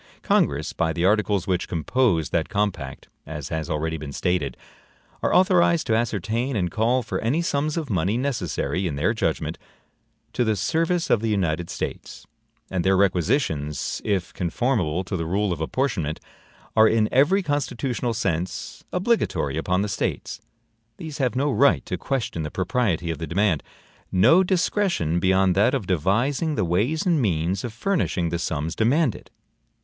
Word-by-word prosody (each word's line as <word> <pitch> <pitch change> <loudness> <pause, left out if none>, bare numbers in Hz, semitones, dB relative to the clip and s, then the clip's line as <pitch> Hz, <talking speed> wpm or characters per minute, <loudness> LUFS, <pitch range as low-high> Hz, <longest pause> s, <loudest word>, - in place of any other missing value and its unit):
Congress, - - +1
by 80 -1 0
the 85 +2 -1
articles 100 -2 +2
which 90 -2 -1
compose 85 - +1
that - - 0
compact 100 -10 -2 0.2
(as 75 -2 -6
has 80 0 -3
already 80 +1 -1
been 75 -2 -7
stated), 75 -5 -1 0.6
are - - +1
authorized 180 -3 +4
to 110 - +2
ascertain 115 +3 -1
and 90 -5 0
call 120 +6 +1
for 110 - -3
any 125 +9 0
sums 150 0 -1
of 160 -3 -2
money 100 0 0
necessary, 95 - -1
in 75 - -3
their 70 - +1
judgment, - - -2 0.7
to 125 - +1
the 110 -2 +1
service 165 - 0
of 110 - +4
the 115 - -1
United 85 -5 0
States; - - -6 0.5
and 90 -2 0
their 95 0 +3
requisitions, 90 - 0
if 100 -4 -1
conformable 90 - 0
to 90 - -4
the 80 -2 -2
rule 100 +2 0
of 80 - -6
apportionment, 85 - -1 0.6
are 110 0 +7
in 110 -1 +3
every 170 +10 +4
constitutional 130 -5 -2
sense 90 -5 -3
obligatory 180 - 0
upon 90 +4 0
the - - -1
States. 100 - -3 0.6
These 155 -3 -7
have 130 -2 0
no 140 +3 +1
right 140 +1 +3
to - - -3
question 130 -11 -2
the 75 - -3
propriety 95 - 0
of 80 - -5
the 80 - -4
demand; 90 0 +1 0.5
no 125 - +5
discretion 175 - +1
beyond 95 +1 +3
that 105 +8 +3
of 120 -8 -2
devising 115 - +1
the 90 - 0
ways 120 - 0
and 170 -5 +3
means 90 -2 0
of 120 - -4
furnishing 115 - -1
the 85 0 -2
sums 80 0 -2
demanded. 125 +3 +1
100 Hz, 160 wpm, -24 LUFS, 85-130 Hz, 0.7 s, are